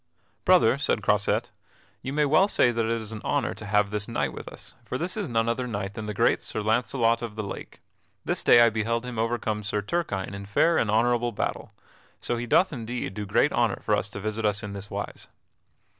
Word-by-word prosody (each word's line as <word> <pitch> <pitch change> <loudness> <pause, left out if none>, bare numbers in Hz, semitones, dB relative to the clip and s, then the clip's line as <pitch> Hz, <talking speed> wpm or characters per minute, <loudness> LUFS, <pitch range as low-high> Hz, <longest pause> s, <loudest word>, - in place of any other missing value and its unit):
"Brother," - - +5
said - - +1
Croisette, - - +1 0.5
"you 130 - -4
may 150 +1 +2
well 155 +7 +4
say 125 -11 +3
that 115 -1 0
it 115 0 -1
is 110 0 -7
an 110 -1 -6
honor 140 -4 0
to 105 - -9
have 105 -1 +2
this 105 -1 -2
knight 115 - -1
with - - -9
us, - - -11
for 125 - -4
this 175 +6 -3
is 210 -5 -2
none 115 -1 +1
other 125 +2 -1
knight 100 -3 -4
than 105 +1 -6
the 105 - -3
great - - +3
Sir - - -4
Launcelot 115 +1 +1
of 115 -3 -6
the 110 - -3
Lake. 100 - -8 0.4
This - - 0
day 120 - +7
I 115 -1 +6
beheld 115 +2 -1
him 125 -3 -5
overcome 115 -2 -1
Sir 105 0 -2
Turquine 100 - -2
in 100 0 -7
fair 165 +11 +3
and 110 - 0
honorable 120 +2 +2
battle. 105 - -4 0.4
So 120 - -2
he 120 +1 -4
doth 175 +8 +3
indeed 120 -6 -4
do 105 +1 -5
great 100 - +3
honor - - +1
for - - +1
to 100 0 -8
visit 110 +2 -3
us 105 0 +1
in 100 -1 -5
this 100 0 -7
wise." - - -6
115 Hz, 220 wpm, -26 LUFS, 105-120 Hz, 0.5 s, day